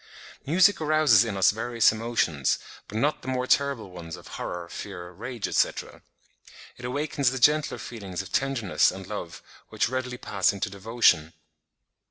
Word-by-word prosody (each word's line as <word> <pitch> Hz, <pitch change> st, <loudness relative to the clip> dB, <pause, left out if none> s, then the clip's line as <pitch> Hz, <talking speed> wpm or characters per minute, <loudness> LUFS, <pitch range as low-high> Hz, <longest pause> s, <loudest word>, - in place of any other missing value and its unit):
Music 185 Hz, +5 st, +4 dB
arouses 155 Hz, -8 st, +5 dB
in 110 Hz, -4 st, -3 dB
us 95 Hz, -, +5 dB
various 115 Hz, +1 st, +2 dB
emotions, 110 Hz, -, 0 dB, 0.3 s
but 105 Hz, -, -6 dB
not 145 Hz, +7 st, +1 dB
the -, -, -12 dB
more 130 Hz, -1 st, -1 dB
terrible 135 Hz, -7 st, +1 dB
ones 85 Hz, -2 st, -8 dB
of -, -, -13 dB
horror, 85 Hz, -1 st, -5 dB
fear, 90 Hz, -1 st, -8 dB
rage, 120 Hz, +5 st, -5 dB
etc. -, -, -1 dB, 0.8 s
It 125 Hz, -, -8 dB
awakens 140 Hz, 0 st, 0 dB
the 130 Hz, -, -4 dB
gentler 150 Hz, +4 st, +3 dB
feelings 100 Hz, -5 st, -6 dB
of 95 Hz, -, -12 dB
tenderness 130 Hz, -8 st, +2 dB
and -, -, -7 dB
love, -, -, -7 dB, 0.3 s
which -, -, 0 dB
readily 130 Hz, -1 st, -3 dB
pass 100 Hz, -4 st, +1 dB
into 100 Hz, 0 st, -3 dB
devotion. 100 Hz, -6 st, +2 dB
115 Hz, 155 wpm, -26 LUFS, 95-130 Hz, 0.8 s, arouses